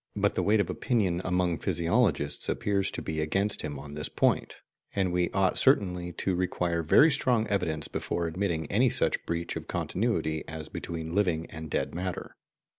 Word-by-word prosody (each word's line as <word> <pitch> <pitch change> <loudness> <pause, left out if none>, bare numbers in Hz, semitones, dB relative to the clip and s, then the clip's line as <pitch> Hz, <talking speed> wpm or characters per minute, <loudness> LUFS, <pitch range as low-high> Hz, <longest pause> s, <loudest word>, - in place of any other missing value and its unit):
* - - -42
But - - +2
the - - 0
weight 105 +1 +3
of 100 - +2
opinion 95 -8 0
among 90 -2 0
physiologists 85 -4 +1
appears 100 -2 0
to - - -6
be 80 0 -2
against 100 +6 0
him 75 -2 -4
on 70 +1 -9
this 75 0 -3
point; - - +1 0.4
and 95 -3 +1
we 90 0 +1
ought 95 -1 +2
certainly 90 -9 +2
to 95 - -1
require 90 -1 0
very 145 - +6
strong 120 -5 +2
evidence 80 -6 -1
before 85 - -2
admitting 85 -1 -1
any 120 +5 +4
such - - +1
breach 85 0 -2
of - - -6
continuity 85 -7 -1
as 80 -1 -7
between 80 -1 -5
living 90 -5 +1
and 80 -1 -7
dead - - -1
matter. 90 +1 -4
90 Hz, 180 wpm, -28 LUFS, 80-100 Hz, 0.4 s, very